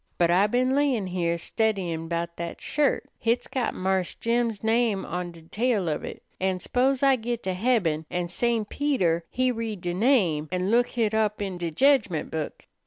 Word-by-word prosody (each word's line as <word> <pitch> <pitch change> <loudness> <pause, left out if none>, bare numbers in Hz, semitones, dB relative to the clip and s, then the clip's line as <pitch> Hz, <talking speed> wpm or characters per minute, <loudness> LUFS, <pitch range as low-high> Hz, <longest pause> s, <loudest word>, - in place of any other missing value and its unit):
But 170 -1 +3
I 190 +4 +4
been 255 +4 +1
layin' 275 -8 +2
heah 175 -2 -1
steddyin' 180 -5 -1
'bout 170 0 -2
dat 170 0 -5
shirt. 295 -2 0
Hit's 235 +1 +1
got 255 -3 -2
Marse 190 -1 -1
Jim's 230 -2 -1
name 225 -3 +1
on 180 0 -4
de 165 -1 -14
tail 210 +2 0
of 155 - -1
it, - - -7 0.2
an' 190 0 0
s'pose 260 +6 +1
I 270 -1 +5
git 235 0 -3
to 185 - -1
heaben, 180 -7 +1
an' 175 -1 -2
St. 225 +4 0
Peter 185 - 0
he 255 0 +1
read 225 -5 -4
de 175 0 -2
name 180 - +2
an' 185 +2 0
look 240 +1 +4
hit 225 -3 -1
up 215 -1 +1
in 190 -3 -4
de 170 -1 -2
jedgment 215 - +2
book. 155 -2 -5
205 Hz, 185 wpm, -26 LUFS, 175-240 Hz, 0.2 s, I